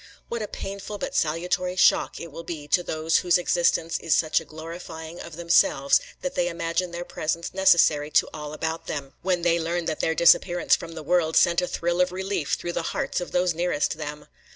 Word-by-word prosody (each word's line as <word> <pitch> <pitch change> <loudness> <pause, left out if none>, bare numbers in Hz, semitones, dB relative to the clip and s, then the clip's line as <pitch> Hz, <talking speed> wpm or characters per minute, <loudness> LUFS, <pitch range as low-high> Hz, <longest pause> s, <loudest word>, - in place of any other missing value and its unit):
What 235 -1 -3
a 210 - -3
painful 200 +1 -6
but 270 +5 -5
salutary 180 - 0
shock 180 - +3
it 170 - -8
will 165 - -7
be 160 -3 -7
to 180 - +3
those 160 -1 0
whose 175 -1 +3
existence 170 -1 +1
is 160 -2 +2
such 155 -1 +2
a - - -12
glorifying 160 +1 -9
of 170 -2 -9
themselves 170 -5 +3 0.2
that 275 0 -2
they 175 -6 0
imagine 170 +1 -2
their 170 +1 -6
presence 165 +1 -3
necessary 165 -6 +4
to - - +3
all 150 -1 -7
about 160 +1 -4
them, 140 -2 -5
when 180 -2 0
they 170 -1 +3
learn 170 +1 -2
that 155 - -2
their 160 - 0
disappearance 175 +1 +4
from 165 0 -8
the 160 -1 -7
world 165 0 +1
sent 170 +1 +4
a 180 - -1
thrill 175 +1 -1
of 180 0 +2
relief 190 -4 -3
through 175 - -2
the - - -1 0.2
hearts - - -1
of 175 - -6
those 180 -1 +1
nearest 170 -3 0
them! 150 -1 -6
170 Hz, 205 wpm, -25 LUFS, 160-180 Hz, 0.2 s, necessary